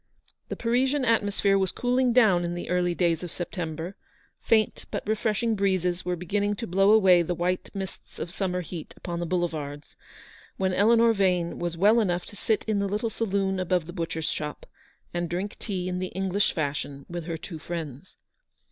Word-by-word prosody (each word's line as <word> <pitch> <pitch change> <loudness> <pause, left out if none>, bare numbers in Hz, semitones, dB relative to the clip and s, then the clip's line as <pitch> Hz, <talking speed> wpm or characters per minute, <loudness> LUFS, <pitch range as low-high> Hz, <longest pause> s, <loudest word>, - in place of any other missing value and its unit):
1G1 - - -39
The - - -3
Parisian 260 +4 +1
atmosphere 205 -3 +2
was 190 -2 +1
cooling 250 0 +1
"down 215 -8 +5
in 175 0 -2
the 175 - -5
early 175 -1 +1
days 170 -3 +1
of 175 - -5
September 170 +1 -5 0.2
— - - -37
faint 220 -2 +3
but - - -4
refreshing 220 +1 +1
breezes 185 -3 +1
were 180 0 -1
beginning 200 +4 -1
to 230 - -4
blow 195 +2 +3
away 190 -5 +6
the 175 +1 -1
white 180 +2 -1
mists 190 -1 -7
of 170 - -5
summer 180 -1 -1
heat 170 -2 -8
upon 170 -1 -4
the 170 - -2
boulevards, 155 -5 -3 0.6
when 190 -1 +1
Eleanor 230 +3 +5
Vane 180 -4 +1
was 175 -1 -3
well 210 +6 +5
enough 180 -5 0
to - - -11
sit 220 +1 0
in 215 -2 +1
the 200 - 0
little 210 +3 -1
saloon 195 -3 0
above 180 -2 +1
the 175 - -8
butcher's 165 -3 -3
shop, 150 -1 -5 0.5
and 175 -1 -2
drink 185 +4 -3
tea 185 -4 -3
in 180 0 -2
the 185 - -2
English 195 +2 0
fashion 140 -2 -3
with 175 -2 -5
her 165 -1 -3
two 160 0 -8
friends. 160 -1 -6
185 Hz, 190 wpm, -27 LUFS, 175-205 Hz, 0.6 s, away